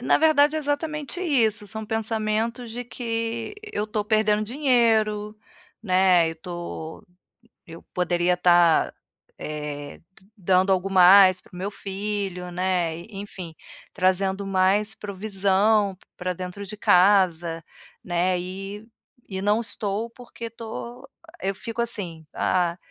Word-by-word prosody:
Na 245 - +3
verdade 310 -1 +4
é - - +1
exatamente 300 +2 -2
isso, 225 - +1
são 220 +2 -6
pensamentos 225 +2 -2
de 240 +2 -5
que 230 - -4
eu 320 - -3
tô 210 0 -2
perdendo 215 0 +2
dinheiro, 220 -4 +1 0.5
né, 185 -4 +4
eu 165 - -9
tô 170 -2 -7 0.6
eu 165 0 -11
poderia 175 0 +1
estar, 175 -2 +4 0.5
eh, 150 -1 -6
d - - -31 0.3
dando 185 +1 +2
algo 190 +1 +1
mais 185 0 +7
para - - -22
o - - -10
meu 195 +3 -3
filho, 195 -2 -4
né, 180 -2 0
e 170 - -11
enfim, 195 -4 -7 0.4
trazendo 190 +2 +1
mais 195 +3 +2
provisão 200 0 +1
p - - -27
pra 180 0 -2
dentro 180 +3 -7
de 210 +2 -8
casa, 175 -4 +3 0.4
né, 180 +1 0
e 195 +4 -7 0.4
e 190 -1 -5
não 210 +3 +2
estou 215 0 -2
porque 235 -1 -9
tô 235 +4 -8 0.3
eu 195 +1 -1
fico 230 +4 -4
assim, 180 -9 -4
ah, 175 -1 0
200 Hz, 130 wpm, -24 LUFS, 180-225 Hz, 0.6 s, mais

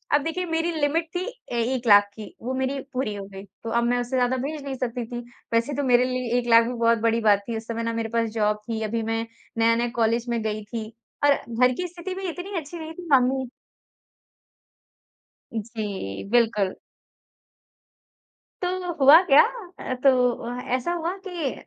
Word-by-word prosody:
अब 290 - +2
देखिए 350 +4 -2
मेरी 330 0 0
लिमिट 320 +3 +1
थी 360 - -1 0.3
ए 235 -1 0
1 245 -2 -4
लाख 205 -1 +8
की 215 0 -10
वो 255 +2 -2
मेरी 265 +1 -1
पूरी 250 -4 -1
हो 200 - -6
गई। 195 0 -10
तो 205 +4 -10
अब 235 - 0
मैं 245 +1 +2
उसे 245 - -6
ज़्यादा 250 +1 +2
भेज 290 +3 -4
नहीं 275 -1 -4
सकती 245 -1 -3
थी। 240 - -3 0.3
वैसे 230 +5 +1
तो 285 - -1
मेरे 250 -1 +4
लिए 250 -1 -1
1 240 - -5
लाख 230 0 +7
भी 245 - -3
बहुत 230 -1 +3
बड़ी 230 0 +2
बात 200 -1 +4
थी 230 -1 -2
उस 220 +1 -8
समय 230 0 -3
ना 230 0 -1
मेरे 225 -1 -2
पास 230 0 0
जॉब 210 -1 +1
थी, 220 -1 -2
अभी 225 +1 -1
मैं 225 +1 -1 0.3
नया-नया 230 +1 +3
कॉलेज 230 +1 +1
में 235 -1 0
गई 215 0 -2
थी 220 +1 -5 0.4
और 285 -1 +6
घर 250 +1 +1
की 360 - -2
स्थिति 350 +2 -6
भी 385 -1 -3
इतनी 365 +3 -5
अच्छी 320 +3 -9
नहीं 320 0 -7
थी 350 +1 -10
मम्मी 260 -1 +3 2.1
जी, 205 - -4
बिल्कुल। 220 -4 +2 1.9
तो 360 -1 -2
हुआ 290 +6 +9
क्या? 295 -3 +8 0.4
अ, 255 - -3
तो 255 -3 +5
अ, 245 +1 -4
ऐसा 260 +7 -2
हुआ 345 +2 -2
कि 335 -7 -2
245 Hz, 190 wpm, -25 LUFS, 230-285 Hz, 2.1 s, हुआ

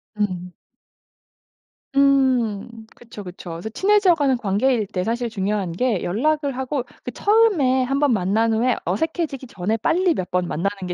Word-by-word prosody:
음. 185 -4 -2 1.4
음 245 -5 +2
그쵸, 230 -4 -11
그쵸. 180 -1 -9
그래서 170 +6 -6
친해져 390 - +3
가는 285 -5 +1
관계일 220 +2 +1
때 180 -2 -3
사실 235 +3 -2
중요한 200 -3 -2
게 215 +2 -1
연락을 285 - 0
하고 265 0 -2 0.2
그 - - -5
처음에 390 - +3
1 270 +2 -1
번 290 -3 +3
만난 215 +3 +1
후에 240 +3 +2
어색해지기 320 -5 -2
전에 205 0 -2
빨리 340 - +2
몇 185 - -4
번 180 -1 0
만나는 195 +4 -3
게 180 - -3
235 Hz, 290 characters per minute, -22 LUFS, 200-275 Hz, 1.4 s, 친해져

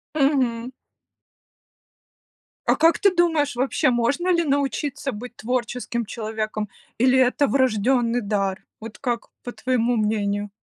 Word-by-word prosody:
Мгм. 260 -4 +1 1.9
А - - +4
как 325 +2 +4
ты 400 -2 +4
думаешь, 320 -6 +2
вообще, 265 +3 +1
можно 280 +10 +1
ли 340 -1 +2
научиться 280 0 -1
быть 245 +2 -8
творческим 240 0 -2
человеком, 215 -1 -4 0.3
или 255 +2 +4
это 260 +3 +3
врождённый 245 -1 +2
дар? 200 -2 -1 0.2
Вот 220 0 -9
как 240 -3 -2 0.2
по 245 - -5
твоему 245 -2 0
мнению? 205 -1 0
245 Hz, 120 wpm, -23 LUFS, 220-275 Hz, 1.9 s, А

